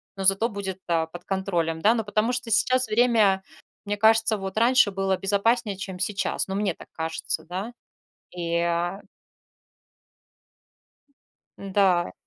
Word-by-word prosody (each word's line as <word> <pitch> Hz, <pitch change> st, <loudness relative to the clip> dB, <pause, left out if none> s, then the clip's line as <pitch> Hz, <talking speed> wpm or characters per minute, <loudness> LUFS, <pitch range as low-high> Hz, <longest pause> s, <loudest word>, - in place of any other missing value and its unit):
ну, 195 Hz, -, -5 dB
зато 195 Hz, +4 st, +3 dB
будет, 195 Hz, -3 st, -5 dB
э, 165 Hz, -1 st, +1 dB
под 175 Hz, 0 st, -9 dB
контролем, 175 Hz, -4 st, -1 dB
да. 225 Hz, +3 st, +4 dB
Ну, 225 Hz, -2 st, -2 dB
потому 215 Hz, +3 st, 0 dB
что 245 Hz, -2 st, -4 dB
сейчас 255 Hz, +4 st, +2 dB
время 215 Hz, -4 st, +3 dB, 0.4 s
мне 205 Hz, 0 st, -2 dB
кажется, 220 Hz, 0 st, +4 dB
вот 195 Hz, +2 st, -6 dB
раньше 235 Hz, -2 st, +4 dB
было 195 Hz, -1 st, 0 dB
безопаснее, 205 Hz, +2 st, +1 dB
чем 190 Hz, -1 st, -7 dB
сейчас. 195 Hz, 0 st, -1 dB
Ну, 190 Hz, -, -3 dB
мне 200 Hz, -3 st, 0 dB
так -, -, -14 dB
кажется, 160 Hz, 0 st, -3 dB
да. 190 Hz, +8 st, -5 dB, 0.6 s
И, 170 Hz, -1 st, -1 dB
а 170 Hz, +3 st, -1 dB, 2.6 s
Н-да. 190 Hz, -3 st, +1 dB
195 Hz, 135 wpm, -25 LUFS, 180-220 Hz, 2.6 s, да